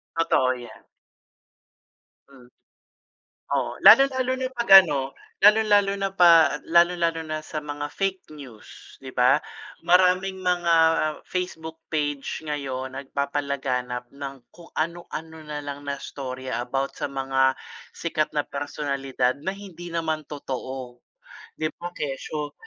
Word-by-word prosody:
Totoo 130 -6 +2
yan. 120 -2 -12 1.4
Hmm. 130 -3 -17 1.1
Oo, - - -2
lalo 275 0 +10
lalo 255 0 0
na 260 - -1
'pag 240 -2 -4
ano, 140 -5 -3 0.3
lalong-lalo 205 -1 +5
na 195 0 -1
pa 165 -3 +6
lalong-lalo 170 -1 +3
na 155 0 -3
sa 155 - -5
mga 145 0 -5
fake 190 -5 -3
news, 130 -7 -13
'di 130 - -8
ba? 125 +3 +4 0.5
Maraming 185 +1 +3
mga 175 -2 +2 0.5
Facebook 160 -3 -5
page 145 -2 -2
ngayon, 130 -3 -4
nagpapalaganap 135 -3 -3
ng 140 -1 -7 0.2
kung 170 - -14
ano-ano 160 -1 -4
na 150 -1 -5
lang 145 0 -7
na 140 - -1
istorya, 130 -2 -5
about 135 +2 -3
sa - - -1
mga 135 -1 +1 0.4
sikat 155 -2 -1
na 150 - +1
personalidad, 140 -3 -2
na 190 - -1
hindi 180 -4 -10
naman 160 -2 -1
totoo. 130 -3 -6 0.6
'Di 155 0 -1
ba, 175 - -4
kesyo, 145 +1 -4
150 Hz, 120 wpm, -24 LUFS, 135-175 Hz, 1.4 s, lalo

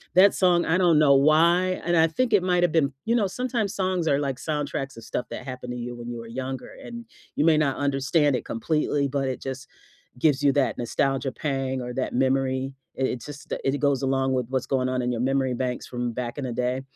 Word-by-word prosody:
That 195 +2 +7
song, 175 -2 +3
I 165 +3 +2
don't 170 -4 +4
know 140 -2 +6
why, 170 +6 +4
and 175 -1 +2
I 160 0 +5
think 235 +7 -1
it 190 -3 +4
might've 175 -2 +2
been 140 -4 +2
you 230 +1 +2
know, 215 -4 +2
sometimes 230 -2 -2
songs 185 -3 0
are, 140 -1 +3
like, 135 -3 -2
soundtracks 145 -4 -3
of 115 - -10
stuff - - -3
that - - -7
happened 125 -1 -6
to - - -5
you 120 0 -5
when 120 0 -8
you 120 - -6
were 115 - -9
younger, 130 +2 -5
and 235 0 -8 0.3
you 145 - +2
may 160 -2 +5
not 140 -3 +1
understand 140 +1 +2
it - - -4
completely, 145 +3 0
but 135 0 -1
it 130 - -4
just 135 0 -6 0.5
gives 145 -1 +2
you 140 - +5
that 140 -2 +1
nostalgia 135 +3 -1
pang, 135 0 -2
or 125 0 -5
that 130 - -2
memory. 130 +1 0 0.2
It 130 - 0
it 120 - -6
just 145 0 -8
it 135 +1 0
goes 140 -2 +1
along 135 0 +1
with 125 -3 -1
what's 130 -1 -1
going 130 -1 0
on 130 0 -1
in 125 0 -1
your 120 0 -2
memory 135 -1 +1
banks 125 0 -3
from 120 -1 -3
back 120 +1 -4
in 140 - -3
the 125 - -3
day. 125 +2 -1
135 Hz, 235 wpm, -25 LUFS, 130-160 Hz, 0.5 s, That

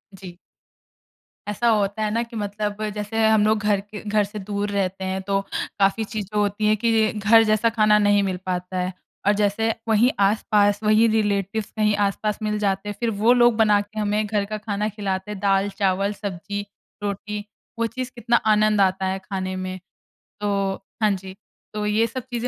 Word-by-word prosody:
जी। 180 -2 -11 1.1
ऐसा 220 +3 -1
होता 210 -1 +1
है 210 - 0
ना 230 - 0
कि 235 0 -11
मतलब 210 0 -3
जैसे 210 +2 0
हम 220 -1 +4
लोग 215 0 +3
घर 205 -1 +2
के 210 +1 -10
घर 210 0 +3
से 205 +1 -7
दूर 205 +1 -3
रहते 190 -1 -2
हैं 190 0 -2
तो 195 0 +2 0.4
काफ़ी 200 +3 +2
चीज़ें 210 -1 -5
होती 205 +1 0
हैं 215 0 +4
कि 225 0 +2
घर 220 +2 +5
जैसा 215 +2 +3
खाना 215 -2 +4
नहीं 205 -1 +3
मिल 185 -2 -1
पाता 180 0 -3
है। 180 +1 -2 0.3
और 205 - +6
जैसे 210 +2 +1
वहीं 225 +3 +4
आस-पास 205 0 +3
वहीं 215 +2 +4
रिलेटिव्स 210 -1 0
कहीं 210 -1 +1
आस-पास 210 +1 -2
मिल 210 0 0
जाते 195 0 -1
हैं 205 - -5
फिर 235 -1 0
वो 230 +3 +5
लोग 240 -2 +4
बना 210 -2 +4
के 215 +1 -8
हमें 210 +1 0
घर 205 -1 -1
का 215 +1 -4
खाना 210 0 -2
खिलाते 200 -1 -4
हैं 205 - -6
दाल, 195 0 +2
चावल, 195 0 0
सब्ज़ी, 205 0 -5 0.4
रोटी 205 +1 -4 0.3
वो 230 - +2
चीज़ 255 +2 -5
कितना 235 0 +1 0.2
आनंद 210 -1 +3
आता 190 0 +2
है 190 +1 -1
खाने 185 -1 -4
में। 185 0 -5 0.6
तो, 200 -1 0 0.3
हाँ 210 - +4
जी। 190 0 -5 0.4
तो 210 0 -2
ये 215 +2 +2
सब 250 +2 -6
चीज़ें 240 +1 -2
210 Hz, 190 wpm, -23 LUFS, 195-215 Hz, 1.1 s, और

